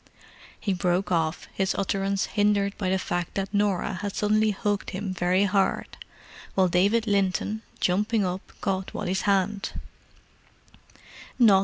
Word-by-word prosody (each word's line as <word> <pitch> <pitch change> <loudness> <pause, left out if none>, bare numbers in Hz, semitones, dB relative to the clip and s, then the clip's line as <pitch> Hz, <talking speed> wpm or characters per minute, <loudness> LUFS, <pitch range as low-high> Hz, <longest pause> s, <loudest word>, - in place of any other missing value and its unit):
He 200 - -1
broke 180 +1 0
off, 160 -1 0
his 190 -1 0
utterance 195 0 0
hindered 205 -1 +1
by 190 -3 -2
the 190 - +2
fact 175 -2 -3
that 195 +1 -2
Norah 200 -2 0
had 205 -1 -4
suddenly 215 +1 +2
hugged 205 0 -1
him 190 0 -4
very 180 +2 +2
hard, 195 -1 +1 0.6
while 190 -1 +4
David 200 +6 +3
Linton, 200 +1 0 0.2
jumping 210 +3 +1
up, 180 +1 -4
caught 190 -1 -2
Wally's 190 +1 -1
hand. 195 +1 +1
195 Hz, 130 wpm, -26 LUFS, 185-205 Hz, 0.6 s, while